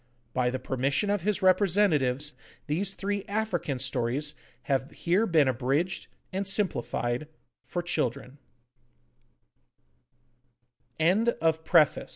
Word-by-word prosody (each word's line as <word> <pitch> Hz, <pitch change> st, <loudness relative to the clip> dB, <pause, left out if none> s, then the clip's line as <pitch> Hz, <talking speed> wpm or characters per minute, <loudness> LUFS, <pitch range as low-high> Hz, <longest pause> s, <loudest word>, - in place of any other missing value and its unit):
By 125 Hz, -1 st, +1 dB
the 130 Hz, -, -2 dB
permission 135 Hz, +9 st, 0 dB
of 205 Hz, -2 st, 0 dB
his 210 Hz, +2 st, -1 dB
representatives 165 Hz, -8 st, +3 dB, 0.3 s
these 190 Hz, +6 st, -1 dB
three 200 Hz, 0 st, -2 dB
African 200 Hz, -9 st, -1 dB
stories 130 Hz, +3 st, -1 dB, 0.3 s
have 135 Hz, 0 st, 0 dB
here 185 Hz, +8 st, +1 dB
been 155 Hz, -5 st, +4 dB
abridged 135 Hz, +8 st, 0 dB, 0.3 s
and 195 Hz, +1 st, -2 dB
simplified 150 Hz, -, -1 dB, 0.4 s
for 175 Hz, -, -3 dB
childr 130 Hz, -6 st, -2 dB
155 Hz, 90 wpm, -28 LUFS, 130-195 Hz, 0.4 s, been